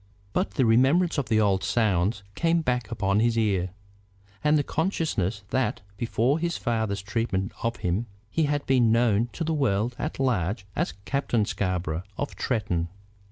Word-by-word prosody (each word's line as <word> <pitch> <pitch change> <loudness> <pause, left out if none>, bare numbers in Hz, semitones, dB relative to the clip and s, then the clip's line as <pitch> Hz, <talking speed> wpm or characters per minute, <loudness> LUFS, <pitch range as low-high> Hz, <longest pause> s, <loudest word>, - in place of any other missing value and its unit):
But 185 - -1
the 130 - +3
remembrance 140 +9 +4
of 125 -6 -3
the 110 -1 +3
old 100 -3 +2
sounds 100 -2 +1
came 165 - +2
back 125 -6 0
upon 100 0 +1
his 115 +1 +2
ear; 100 -5 +1 0.7
and 150 +1 +4
the 145 - +2
consciousness 140 - -1
that, 130 -7 0
before 120 +6 +1
his 170 0 -1
father's 110 -5 -1
treatment 100 -2 -1
of 115 +1 0
him, 95 +3 -1 0.2
he 160 - +2
had 145 0 -1
been 125 -4 +4
known 115 -1 +3
to 165 - -3
the 160 0 0
world 120 -5 +1
at 155 -1 -3
large 105 -5 0
as 80 - -1
Captain 125 -6 +1
Scarborough, 90 -5 -1 0.2
of 145 - -3
Tretton. 90 -8 -1
115 Hz, 160 wpm, -26 LUFS, 100-135 Hz, 0.7 s, remembrance